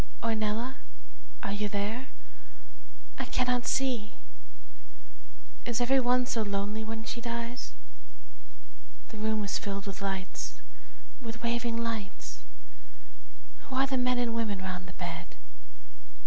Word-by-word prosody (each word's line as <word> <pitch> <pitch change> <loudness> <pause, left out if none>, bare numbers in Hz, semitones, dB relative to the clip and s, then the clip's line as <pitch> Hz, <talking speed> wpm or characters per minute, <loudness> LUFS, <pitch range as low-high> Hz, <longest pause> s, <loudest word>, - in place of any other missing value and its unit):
Ornella, 225 +3 +1 0.7
are 200 - 0
you 205 +1 +1
there? 210 +6 0 1.1
I - - +1
cannot 250 -1 +2
see 250 -6 +2 1.5
Is 240 -1 +1
every 260 +2 +6
one 250 0 +5
so 240 -3 +1
lonely 205 +1 0
when 225 +1 -3
he 240 - -3
dies?,p> 235 +1 -3 1.3
The 220 - -8
room 220 -1 +2
is 200 - +1
filled 200 -1 -2
with 200 0 -4
lights 195 -1 -2 0.6
with 230 -1 -5
waving 235 0 +2
lights 225 -4 -2 1.3
Who 260 - -3
are 265 +1 +6
the 270 0 +1
men 250 0 +4
and 240 -2 +2
women 225 -3 +1
'round 185 -1 -3
the 180 - -8
bed? - - -4
230 Hz, 120 wpm, -32 LUFS, 205-245 Hz, 1.5 s, every